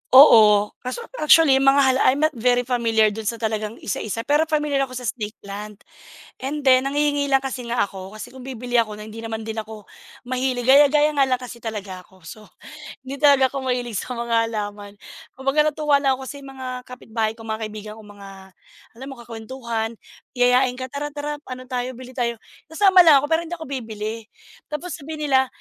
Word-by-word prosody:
Oo. 210 -6 +8
Kaso 255 - -6 0.2
actually, 305 -3 +6
yung 270 - +1
mga 275 +1 +6
hala 260 0 +3
I'm 275 +3 +3
not 310 - +3
very 245 +1 +2
familiar 230 -3 +2
dun 215 +1 -6
sa 230 - 0
talagang 220 -1 -3
isa-isa, 220 +2 -3
pero 295 +4 +2
pamilyar 295 -3 0
ako 255 - -10
sa 250 - -6
snake 215 -2 -4
plant. 205 +1 -8 0.6
And 290 +3 -4
then, 260 -1 +4
nanghihingi 290 0 +1
lang 270 -1 +2
kasi 260 -2 -5
nga 235 +1 0
ako, 190 0 -6
kasi 215 +3 -8
kung 255 0 -12
bibili 245 -1 -2
ako 220 -2 +1
na 210 - -9
hindi 220 +1 -10
naman 225 -1 -5
din 220 0 -6
ako 215 -1 -7 0.4
mahilig, 255 0 -1
gaya-gaya 290 +2 +6
nga 275 - +5
lang 255 -1 0
kasi 245 -1 -9
talaga 200 -5 -7
ko, 190 -1 -23
so 215 +6 -11 0.6
hindi 270 - -4
talaga 280 -3 +6
ako 270 +1 -5
mahilig 245 -2 -3
sa 200 - -4
mga 235 -1 -2 0.2
halaman. 205 -1 -6 0.4
Kumbaga 300 +3 +2
natuwa 300 -1 +1
lang 270 -1 +3
ako 265 - -8
kasi - - -7
yung 275 - -10
mga 260 -1 -8 0.2
kapitbahay 225 -3 -3
ko, 225 +1 -14
mga 220 0 -3
kaibigan 215 0 -9
kong 215 -1 -14
mga, 200 0 -10 0.7
alam 265 - -7
mo 270 - -8
kakwentuhan, 230 -1 -5 0.4
yayain 250 +1 +3
ka, 255 0 -7
"Tara, 290 +1 -4
tara, 295 0 -4
ano 255 0 -7
tayo, 250 0 -3
bili 255 +1 -11
tayo." 240 -2 -2 0.3
sasama 380 +4 +4
lang 285 -3 +7
ako 290 - -4
pero 325 +1 +3
hindi 345 - -4
ako 320 -2 -9
bibili. 225 -4 -5 0.4
Tapos 335 +4 -5
sabihin 300 0 -5
nila 265 0 +4
250 Hz, 200 wpm, -22 LUFS, 220-275 Hz, 0.7 s, Oo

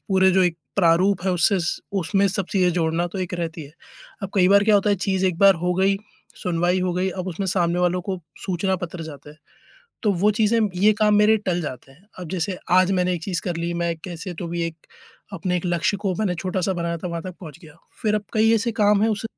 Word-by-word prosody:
पूरे 190 -1 +4
जो 190 +1 +4
एक 170 -2 0 0.2
प्रारूप 180 +1 +3
है 190 - +1
उससे 190 +3 +2 0.4
उसमें 195 +4 +1
सब 190 0 -2
चीज़ें 185 -3 +3
जोड़ना 165 0 0
तो 195 - -4
एक 185 0 -3
रहती 165 -2 -4
है। 140 - -14 0.5
अब 195 - -4
कई 185 -2 +4
बार 200 +1 +5
क्या 215 0 +4
होता 205 +1 +2
है 200 - +2
चीज़ 190 0 0
एक 180 -3 -1
बार 195 0 +7
हो 180 0 +1
गई, 195 +2 +2 0.5
सुनवाई 175 +1 +1
हो 180 -1 0
गई, 185 +1 0
अब 185 0 -5
उसमें 190 +3 -3
सामने 175 -1 +1
वालों 180 0 +1
को 190 0 -4 0.3
सूचना 190 +1 0
पत्र 180 -1 -6
जाता 145 -2 -10
है। 150 - -16 0.7
तो 215 - +2
वो 195 +4 +2
चीज़ें 220 +2 +2 0.2
ये 205 +4 +5
काम 210 -1 +4
मेरे 210 +1 +5
टल 175 -1 0
जाते 135 -2 -7
हैं। 180 +9 -24
अब 180 - -7
जैसे 185 0 -2
आज 185 +1 +5
मैंने 180 -1 +1
एक 170 - -6
चीज़ 180 -4 -2
कर 175 -2 -3
ली, 170 +1 -2
मैं 170 -1 -1
कैसे 175 0 -6
तो 170 - -6
भी 170 0 -3
एक 165 -1 -10 0.5
अपने 180 0 -1
एक 175 - -3
लक्ष्य 175 +3 0
को 195 -3 -1
मैंने 195 -5 0
छोटा-सा 185 +1 -2
बनाया 170 -1 -2
था, 180 - -5
वहाँ 170 -1 -4
तक 185 0 -7
पहुँच 160 -3 -10
गया। 155 -1 -15 0.3
फिर 215 -2 +1
अब 210 -1 -1
कई 225 0 +3
ऐसे 230 +1 0
काम 210 -2 +3
हैं 220 - +3
उस 210 0 -3
180 Hz, 240 wpm, -22 LUFS, 170-195 Hz, 0.7 s, बार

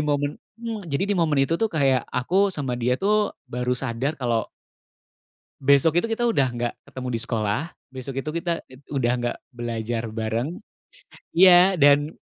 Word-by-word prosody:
momen 145 0 0 0.2
mmm, 225 -5 -6
jadi 140 +4 -1
di - - 0
momen 155 -4 +2
itu, 165 +4 0
tuh, 225 - +3
kayak 135 -5 +2
aku 185 +11 +2
sama 145 -8 -3
dia, 125 +1 +1
tuh, 210 +3 +1
baru 125 +1 -1
sadar 130 +4 -2
kalau 120 -5 0 1.2
besok 140 +5 +4
itu - - -2
kita 235 +2 0
udah 180 - +2
nggak 120 0 -3 0.2
ketemu 130 -1 -6
di 115 - 0
sekolah, 110 +2 0 0.3
besok 130 +1 -6
itu - - -4
kita 170 -1 -2
ed 130 +2 -16
udah 125 -4 +1
nggak 120 - -2 0.2
belajar 115 -1 -3
bareng. 115 +9 -3 0.7
Iya, 180 +1 +6
dan 145 +1 +5
140 Hz, 160 wpm, -24 LUFS, 120-170 Hz, 1.2 s, Iya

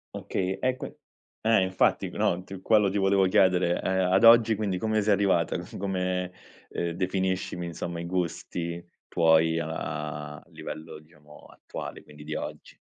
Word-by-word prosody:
Okay, 95 0 -2
e 130 0 +1
quin - - -7 0.5
eh, 110 -2 +4
infatti, 95 0 +1
no, 90 +1 0
t 95 0 -9
quello 105 -1 +4
ti 100 - -2
volevo 95 0 +3
chiedere. 90 -2 +3
Ehm, 95 -1 +1
ad 95 +5 +5
oggi, 115 -1 +7
quindi, 100 -3 -1
come 110 +2 0
sei 105 0 +3
arrivata? 95 -5 +2
C 90 +6 -8
come 90 -1 -2 0.4
ehm, 85 - -2
definiscimi, 95 0 -2
insomma, 85 0 -5
i - - -5
gusti 85 -1 -3 0.2
tuoi 80 0 +3
a 75 -2 -5
livello, 80 0 -8
diciamo, 75 -1 -18
attuale, - - -8
quindi 75 0 -14
di 75 0 -4
oggi. - - -7
90 Hz, 155 wpm, -27 LUFS, 85-95 Hz, 0.5 s, oggi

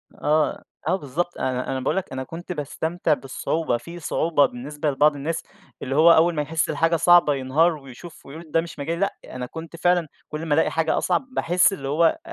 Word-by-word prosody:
آه، 150 +1 0 0.2
آه - - +3
بالضبط، 175 +2 -3
أنا 130 0 -2
أنا 130 - -2
باقول 130 - -1
لك 190 - -3
أنا 130 0 -3
كنت 170 +6 -8
باستمتع 160 +1 -1
بالصعوبة، 135 +1 -2
في 170 +8 -10
صعوبة 155 -2 +2
بالنسبة 145 +4 -3
لبعض 145 +2 +3
الناس، 155 +4 -3 0.4
اللي 135 +1 -3
هو 165 +2 +7
أول 165 +1 +4
ما 150 - 0
يحِسّ 155 +2 -1
الحاجة 165 +1 +2
صعبة 175 -2 +5
ينهار، 150 +6 +2
ويشوف 135 +5 -12
ويقول 155 +3 -11
ده 165 - +3
مش 170 -3 -10
مجالي، 165 +4 -3
لأ، 200 - 0
أنا 125 -1 -6
كنت 165 +5 -9
فعلًا 175 -1 +2 0.2
كُلّ 155 +2 -5
ما 150 - +1
ألاقي 160 - +2
حاجة 165 -1 +1
أصعب، 185 +8 0
باحِسّ 180 +1 +3
اللي 135 -7 -5
هو 165 - +2
160 Hz, 200 wpm, -23 LUFS, 140-170 Hz, 0.4 s, هو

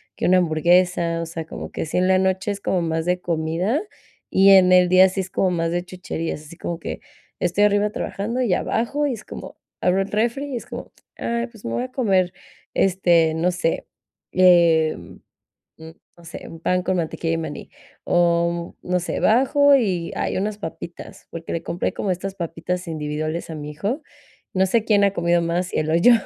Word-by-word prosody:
que - - -3
una 185 +1 +5
hamburguesa, 170 0 +2
o - - -3
sea, 165 0 -6
como - - -7
que - - -3
si 155 - -3
en 185 +1 +3
la 190 0 +4
noche 190 +2 0
es 200 0 -6
como 180 -2 0
más 160 -1 -1
de 180 0 +1
comida, 170 - -1 0.5
y 195 +1 +6
en 185 -1 +7
el 180 -1 +6
día 185 +1 +7
sí 190 - -4
es 185 - -7
como 190 - +1
más 165 -1 -1
de 175 0 -1
chucherías, 165 -4 -5
así 170 - -12
como 170 -1 -4
que - - -6 0.4
estoy 180 +4 +3
arriba 205 0 +2
trabajando 225 +6 -3
y 215 -7 +2
bajo, 285 +10 0
y - - -1
es 220 - -9
como - - -9 0.2
abro 185 +2 +2
el 195 - -4
refri 240 +6 -1
y - - -1
es - - -8
como: - - -8 0.2
"Ay, 235 +1 -2
pues 230 -4 -16
me 115 - -3
voy - - -1
a 255 - -7
comer, 190 -8 +1 0.4
este, 175 -4 +3
no 175 +3 +1
sé, 175 -2 -1 0.5
eh, 170 -3 +5
mm, - - -16 0.8
no 170 - -16
sé, 165 - -9
un 165 - -11
pan 180 +1 +1
con 185 0 0
mantequilla 165 0 -2
de - - +1
maní", 160 -2 -6 0.4
o 170 0 +1
no 180 0 0
sé, 175 - -3
bajo 275 +4 +5
y: 185 -9 -1
"Ay - - -1
unas 205 +1 -2
papitas", 170 -1 -8
porque 165 0 -7
le 165 - -2
compré 175 - -2
como 195 - -2
estas 190 +2 -3
papitas 175 +1 -4
individuales 155 +1 -3
a 160 - -5
mi 150 0 -6
hijo, 205 - -3 0.5
no 190 0 +3
sé 225 +3 +1
quién 205 -3 +3
ha 200 - +3
comido 170 -1 +2
más, 175 +2 -1
si - - -3
él 155 - 0
o - - +2
yo, 240 +8 +6
180 Hz, 205 wpm, -22 LUFS, 165-200 Hz, 0.8 s, en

